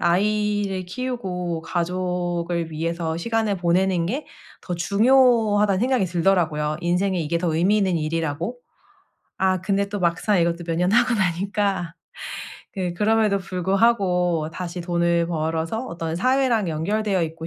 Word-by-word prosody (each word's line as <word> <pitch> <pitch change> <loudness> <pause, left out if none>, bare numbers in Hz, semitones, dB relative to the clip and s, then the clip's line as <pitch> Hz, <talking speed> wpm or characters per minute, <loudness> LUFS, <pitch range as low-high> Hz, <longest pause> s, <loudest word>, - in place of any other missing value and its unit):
'아이를 205 +1 +1
키우고 180 -7 -4
가족을 175 -1 -2
위해서 165 +1 -2
시간을 220 +1 0
보내는 175 0 +1
게 270 +10 -3 0.3
더 180 - -4
중요하다.‘는 210 0 +3
생각이 250 -5 +2
들더라고요. 165 -4 +1
인생에 180 +2 0
이게 165 +1 -1
더 165 -2 -1
의미 190 +6 +3
있는 190 -4 +1
일이라고. 165 +6 -2 0.8
아 185 -1 +2
근데 200 +1 0
또 205 0 -4
막상 180 +4 +1
이것도 170 +1 0
몇 165 - -1
년 180 +3 +1
하고 240 +1 +4
나니까 190 -2 -1 0.8
그 185 -3 -2
그럼에도 215 +1 +2
불구하고 185 -3 +1
다시 175 +1 -5
돈을 170 -1 +1
벌어서 165 +7 -2
어떤 165 -5 -4
사회랑 250 -3 +2
연결되어 190 +4 0
있고 160 0 -7
180 Hz, 310 characters per minute, -23 LUFS, 170-205 Hz, 0.8 s, 하고